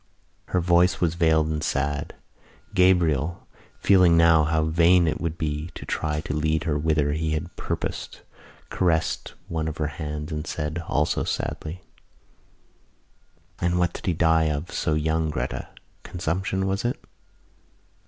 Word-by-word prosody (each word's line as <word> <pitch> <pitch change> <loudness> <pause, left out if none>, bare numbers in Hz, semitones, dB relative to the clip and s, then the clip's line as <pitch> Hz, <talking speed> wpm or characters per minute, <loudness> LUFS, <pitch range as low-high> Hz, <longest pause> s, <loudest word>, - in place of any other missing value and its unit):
Her 90 - 0
voice 90 +1 +3
was 85 -2 +1
veiled 80 -2 +2
and 75 -1 -2
sad. 70 +1 -2 0.6
Gabriel, 90 -4 +2 0.3
feeling 90 -4 +5
now 85 -2 +5
how 80 0 +1
vain 85 +2 +4
it 75 - -1
would 85 0 -2
be 75 -1 -3
to - - -8
try 75 -1 -2
to 75 - -4
lead 80 +1 0
her 80 -3 0
whither 75 -1 +1
he 80 +1 -1
had 80 +3 -4
purposed, - - -4 0.5
caressed 85 -3 0
one 80 -1 -2
of 80 - -4
her 75 -2 -1
hands 75 +1 -4
and 75 +1 -4
said, 80 +2 -3
also 75 +1 +1
sadly: 85 +4 -4 1.8
"And 90 0 +1
what 90 -1 +1
did - - -8
he 90 - +3
die 80 -1 +3
of 75 +2 -2
so 80 -3 0
young, 80 +1 0
Gretta? 65 -5 -3 0.3
Consumption, 95 +2 -2
was 95 0 -1
it?" 120 +1 -1
80 Hz, 145 wpm, -25 LUFS, 75-85 Hz, 1.8 s, feeling